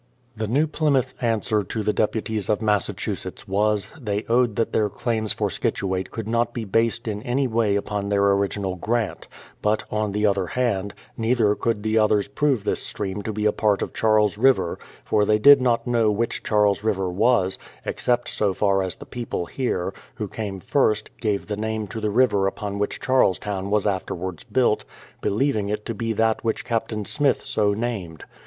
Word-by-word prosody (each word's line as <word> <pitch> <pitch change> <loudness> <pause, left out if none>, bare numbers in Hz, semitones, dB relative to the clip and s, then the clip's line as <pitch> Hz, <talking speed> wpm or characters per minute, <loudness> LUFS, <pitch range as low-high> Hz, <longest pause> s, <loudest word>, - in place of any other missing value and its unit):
The 110 0 -3
New 140 +8 +2
Plymouth 150 -4 +1
answer 110 -2 +1
to 110 +3 -4
the 105 +1 +1
deputies 110 -1 -1
of 105 - +2
Massa 105 -2 +1
chusetts - - -5
was, 105 +1 +1
they 105 -2 -2
owned 120 -2 +2
that 115 - -1
their 105 -1 +2
claims 110 0 -1
for - - -1
Scituate 95 -1 -2
could 115 -2 -6
not 115 +1 0
be 115 -2 -3
based 115 +4 0
in 105 -1 -3
any 125 +4 0
way 110 -3 +1
upon 100 0 -2
their 100 0 +3
original 100 -1 0
grant; 110 +3 -2 0.3
but, 105 +1 +1
on 105 -1 0
the 105 +1 0
other 100 -3 +1
hand, 100 -5 -1 0.2
neither 115 -2 +2
could 105 -1 -1
the 110 0 +2
others 105 -2 +3
prove 140 -8 0
this - - 0
stream 100 0 -4
to 110 - -3
be 105 0 -2
a 105 - +5
part 105 -2 +1
of - - -6
Charles 105 -2 +2
River, 130 -8 +3 0.3
for 105 - +2
they 105 +1 +3
did 140 +4 +8
not 120 -2 +1
know 120 -3 +2
which 110 +3 -1
Charles 105 -1 +2
River 100 -4 0
was, 100 -1 +2 0.3
except 120 -1 0
so 100 -3 0
far 100 -1 +2
as 95 -1 -3
the - - -11
people 120 -7 -4
here, 95 -4 -2 0.2
who 105 - -4
came 100 -1 -5
first, 110 -1 0
gave 105 -3 -1
the 105 - -3
name 110 0 -2
to 110 +2 -6
the 105 - 0
river 105 -3 +3
upon 100 0 -4
which 105 - -2
Charlestown 100 -6 +1
was 105 -1 +1
afterwards 95 -3 -3
built, 125 -4 +2 0.4
believing 110 -2 0
it 105 0 -3
to 115 - -3
be 115 +2 -2
that 110 +1 +1
which 115 -1 -1
Captain 110 -2 -2
Smith 145 +3 +1
so 105 -1 +1
named. 100 -8 -4
105 Hz, 190 wpm, -23 LUFS, 100-115 Hz, 0.4 s, did